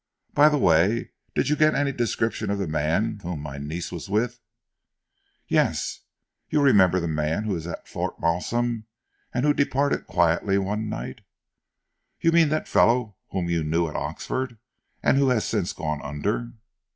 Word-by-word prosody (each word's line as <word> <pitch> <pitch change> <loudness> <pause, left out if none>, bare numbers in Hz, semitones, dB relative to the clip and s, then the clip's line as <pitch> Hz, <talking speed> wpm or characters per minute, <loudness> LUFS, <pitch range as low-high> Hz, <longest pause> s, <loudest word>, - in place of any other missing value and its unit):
"By 150 +1 +7
the 150 - +1
way, 95 - +3 0.2
did - - +1
you 150 - +3
get 155 0 +4
any 140 -1 +1
description 115 -4 -1
of 100 - 0
the 100 - -1
man 80 +8 0
whom 85 -3 -4
my 70 -1 -6
niece 80 +5 -5
was 85 +3 -7
with?" 120 +4 0 1.1
"Yes. - - +1 0.5
You 150 - +2
remember 95 -10 +5
that 85 - -2
man 80 +4 -1
who 105 -2 -1
was 85 -2 -4
at 85 - -7
Fort - - -4
Malsun, 115 +7 0 0.5
and 125 +3 0
who 150 - +4
departed 140 0 0
quietly 85 +3 +2
one 105 +3 -1
night?" 110 - -6 1.0
"You 165 - +3
mean 165 -2 +5
that 155 +1 -1
fellow 115 -3 +3
whom 90 -3 -2
you 85 -2 0
knew 80 +2 +1
at 75 - -8
Oxford, 130 -3 -3 0.5
and - - +4
who 140 -1 +4
has 120 -4 +2
since 100 -5 -1
gone 75 -2 -3
under?" 105 +11 -3
105 Hz, 165 wpm, -25 LUFS, 85-125 Hz, 1.1 s, By